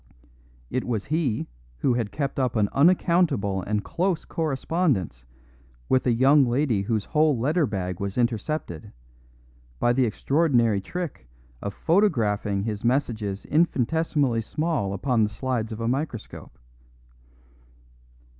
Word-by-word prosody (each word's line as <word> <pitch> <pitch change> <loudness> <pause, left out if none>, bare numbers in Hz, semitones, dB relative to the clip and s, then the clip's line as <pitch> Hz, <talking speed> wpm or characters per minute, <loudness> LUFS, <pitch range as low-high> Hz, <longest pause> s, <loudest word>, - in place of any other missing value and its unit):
It 130 - -1
was 110 -4 -2
he 150 -7 -1 0.3
who 130 - +1
had 115 -4 -2
kept 140 +3 -3
up 125 -3 0
an 105 -2 +2
unaccountable 150 - +2
and 105 +2 -2
close 180 -1 -1
correspondence 135 - -1 0.6
with 130 0 +2
a - - +4
young 135 +5 +5
lady 120 -4 +1
whose 105 0 -1
whole 155 -3 +2
letter 150 +6 +1
bag 90 -3 -4
was 100 +1 -4
intercepted, 120 - -2 0.9
by 120 - +2
the 130 0 +2
extraordinary 120 -4 +2
trick 165 - -6 0.3
of 100 -1 -5
photographing 105 - +1
his 105 -1 -4
messages 115 -6 -1
infinitesimally 150 -4 +1
small 145 -6 -2
upon 120 +4 0
the 105 - +2
slides 115 0 -3
of 110 - -6
a 115 - -2
microscope. 130 -3 -4
120 Hz, 125 wpm, -25 LUFS, 105-150 Hz, 0.9 s, young